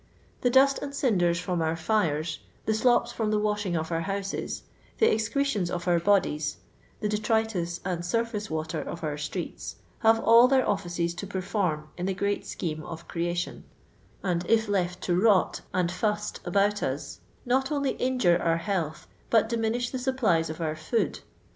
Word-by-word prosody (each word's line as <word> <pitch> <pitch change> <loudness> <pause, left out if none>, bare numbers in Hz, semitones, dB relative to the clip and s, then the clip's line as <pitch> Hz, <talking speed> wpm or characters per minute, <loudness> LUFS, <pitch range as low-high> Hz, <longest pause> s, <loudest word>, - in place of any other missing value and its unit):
The 245 - +3
dust 270 +2 +5
and 280 0 -5
cinders 180 -11 +2
from 180 -1 -1
our 160 0 +1
fires, 160 -4 0 0.3
the 220 - +2
"slops" 240 +2 +3
from 220 -2 -1
the 215 - +2
washing 210 -4 0
of 160 +1 -3
our 165 0 0
houses, 195 +2 -3 0.3
the 445 - +4
excre 225 +6 0
tions 205 -11 0
of 175 0 -4
our 175 -1 +4
bodies, 165 -6 +1 0.4
the 210 - +1
detritus 210 -5 0
and 175 -2 -2
"surface 215 +2 -1
water" 155 0 -2
of 170 - -7
our 150 -2 -1
streets, 160 +4 -5 0.2
hare 225 0 +5
all 230 +2 +7
their 265 0 +3
offices 175 -3 -1
to 175 +3 -6
perform 185 -5 -2
in 180 - -1
the 190 - -1
great 200 +1 -1
scheme 155 -3 -3
of 165 0 -8
creation; 175 +1 -2 0.6
and 175 -2 0
if 225 -1 +4
left 180 -3 -1
to 175 - +1
rot 200 0 +3
and 180 -1 +1
fust 210 +2 -1
about 200 +3 +2
us 135 +2 -3 0.3
not 265 +3 +1
only 280 -2 +1
injure 250 -9 +2
our 165 -1 +2
health, 165 -4 -2 0.2
but 225 -1 +4
diminish 235 +1 0
the 260 - -3
supplies 225 - +1
of 160 - -6
our 155 -2 -1
food. 155 +9 -1
195 Hz, 175 wpm, -27 LUFS, 170-225 Hz, 0.6 s, all